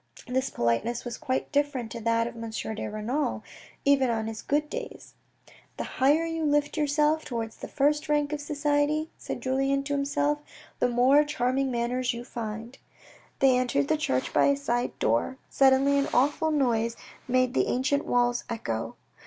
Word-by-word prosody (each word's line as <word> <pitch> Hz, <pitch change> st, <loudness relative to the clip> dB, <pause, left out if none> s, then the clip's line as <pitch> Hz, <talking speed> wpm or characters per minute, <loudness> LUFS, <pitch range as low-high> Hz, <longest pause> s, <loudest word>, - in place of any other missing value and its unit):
This 260 Hz, +2 st, -1 dB
politeness 120 Hz, -, -1 dB
was 240 Hz, -, -4 dB
quite 260 Hz, 0 st, -2 dB
different 285 Hz, -6 st, 0 dB
to 235 Hz, -, -5 dB
that 230 Hz, 0 st, +1 dB
of 235 Hz, -, -5 dB
M. 230 Hz, 0 st, -6 dB
de 220 Hz, 0 st, -4 dB
Renal, 225 Hz, +8 st, -2 dB, 0.4 s
even 275 Hz, -2 st, +4 dB
on 225 Hz, -1 st, -1 dB
his 220 Hz, 0 st, -5 dB
good 300 Hz, +1 st, 0 dB
days. 480 Hz, +9 st, -7 dB, 0.3 s
" -, -, -24 dB
The -, -, -2 dB, 0.2 s
higher 295 Hz, +5 st, +4 dB
you 325 Hz, -1 st, -3 dB
lift 290 Hz, -1 st, +1 dB
yourself 300 Hz, +1 st, +2 dB
towards 230 Hz, -3 st, -4 dB
the -, -, -7 dB
first 295 Hz, +2 st, +1 dB
rank 295 Hz, 0 st, +1 dB
of 295 Hz, -, -3 dB
society," 295 Hz, +1 st, 0 dB
said -, -, -5 dB
Julien 270 Hz, +1 st, +1 dB
to 285 Hz, +1 st, -3 dB
himself, 285 Hz, +1 st, 0 dB, 0.4 s
"the -, -, +2 dB
more 255 Hz, +5 st, +5 dB
charming 270 Hz, -2 st, 0 dB
manners 245 Hz, +1 st, -1 dB
you 235 Hz, -, -6 dB
find." 230 Hz, +1 st, -6 dB, 0.6 s
They 265 Hz, -2 st, +4 dB
entered 255 Hz, +3 st, +1 dB
the 315 Hz, -, +4 dB
church 130 Hz, -, -1 dB
by -, -, +4 dB
a 280 Hz, 0 st, +3 dB
side 245 Hz, -3 st, -2 dB
door; 115 Hz, -, 0 dB
suddenly 275 Hz, +1 st, +4 dB
an 280 Hz, -, 0 dB
awful 290 Hz, +5 st, +2 dB
noise 235 Hz, -6 st, +1 dB, 0.3 s
made 255 Hz, 0 st, +2 dB
the -, -, +2 dB
ancient 280 Hz, +3 st, +1 dB
walls 245 Hz, 0 st, +1 dB
echo. 115 Hz, -, -3 dB
265 Hz, 170 wpm, -27 LUFS, 235-290 Hz, 0.6 s, more